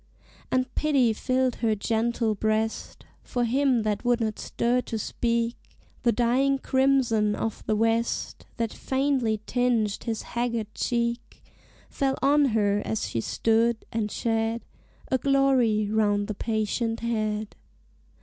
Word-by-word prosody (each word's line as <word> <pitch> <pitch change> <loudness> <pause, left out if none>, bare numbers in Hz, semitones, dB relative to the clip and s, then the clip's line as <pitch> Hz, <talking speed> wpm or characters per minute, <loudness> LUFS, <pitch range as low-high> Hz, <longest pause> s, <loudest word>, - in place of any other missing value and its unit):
And 255 0 0
pity 275 -7 +2
filled 255 +2 0
her 225 -2 +1
gentle 225 +1 0
breast 220 +1 -2 0.2
For 245 -1 -1
him 255 -1 +2
that 210 -2 -1
would 245 -1 +2
not 220 -2 -2
stir 245 +2 0
nor 225 - -1
speak 235 +2 -1 0.4
The 235 - +3
dying 250 +4 +2
crimson 260 -6 +2
of 225 - -4
the 215 - +2
west, 225 +2 -1
That 230 -2 -2
faintly 265 -5 0
tinged 240 -4 0
his 225 -2 -2
haggard 235 -3 -3
cheek, 235 0 -2 0.4
Fell 270 -1 -1
on 290 +1 +5
her 205 -4 +1
as 220 - -2
she 115 - -2
stood, 225 - +1
and 220 -2 -1
shed 225 +1 -1 0.5
A 260 - +2
glory 260 -6 +3
round 205 -2 +2
the 215 - -3
patient 225 +2 -2
head. 215 -2 -2
230 Hz, 130 wpm, -26 LUFS, 220-250 Hz, 0.5 s, on